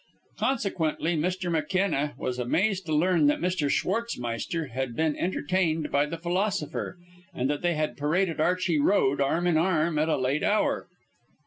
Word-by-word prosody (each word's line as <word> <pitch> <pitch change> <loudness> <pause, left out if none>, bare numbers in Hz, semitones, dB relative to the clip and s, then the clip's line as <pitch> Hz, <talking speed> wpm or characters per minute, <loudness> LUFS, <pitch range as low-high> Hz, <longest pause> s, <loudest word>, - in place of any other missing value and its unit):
Consequently, 175 - 0
Mr. 180 +3 -1
McKenna 165 -3 0
was 125 0 -3
amazed 185 - 0
to - - -3
learn 165 -1 +3
that 145 - +3
Mr. 175 -4 0
Schwartzmeister 165 - -2
had 130 -1 -3
been 160 0 +1
entertained 170 -3 0
by 145 +1 +2
the 165 - -5
philosopher, 180 0 -2 0.4
and 125 - 0
that 145 - -3
they 175 -1 +1
had 155 0 -2
paraded 165 +3 0
Archey 180 -1 +1
Road 140 -4 +2
arm 160 +5 +1
in 175 -3 +3
arm 165 -2 +1
at 155 +1 +1
a - - +2
late 135 +3 0
hour. 210 +1 +1
165 Hz, 155 wpm, -27 LUFS, 150-185 Hz, 0.4 s, learn